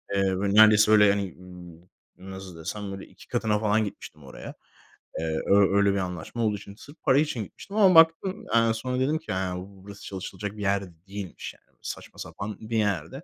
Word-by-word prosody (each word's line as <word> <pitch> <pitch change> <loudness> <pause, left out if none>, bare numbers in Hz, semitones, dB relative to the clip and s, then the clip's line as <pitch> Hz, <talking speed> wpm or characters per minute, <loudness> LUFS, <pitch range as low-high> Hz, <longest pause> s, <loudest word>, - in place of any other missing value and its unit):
Eee, 100 - +2
böyle, 95 +1 0
neredeyse 110 0 +7
öyle, 105 -1 +7
yani, 100 -3 +1
ııı, 90 +1 -14
nasıl 95 -3 -9
desem, 100 +4 -5
böyle, 95 0 -7
2 - - -18
katına 105 -1 0
falan 110 0 +2
gitmiştim 75 -6 -10
oraya. 65 - -9 0.7
Eee, 80 -1 -2
ö 100 0 +4
öyle 100 -1 +4
bir - - -1
anlaşma 90 +5 -3
olduğu 105 -1 +1
için 100 0 -12
sırf 145 +7 -14
para 135 +1 +4
için 145 -7 0
gitmiştim 200 - -10
ama 190 -4 +6
baktım. 165 +5 +4
Yani, 115 -1 +4
sonra 125 +3 -3
dedim 145 +4 +1
ki, 160 - -8
yani, 95 -1 -2
b - - -12 0.2
burası 100 0 -11
çalışılacak 100 +2 -6
bir - - -7
yer 100 0 +1
de 90 - -12
değilmiş, 100 -2 -7
yani. - - -30
Saçma - - -8
sapan 105 +1 -6
bir 110 +1 -3
yerdi. 100 - -1
100 Hz, 200 wpm, -26 LUFS, 95-110 Hz, 0.7 s, neredeyse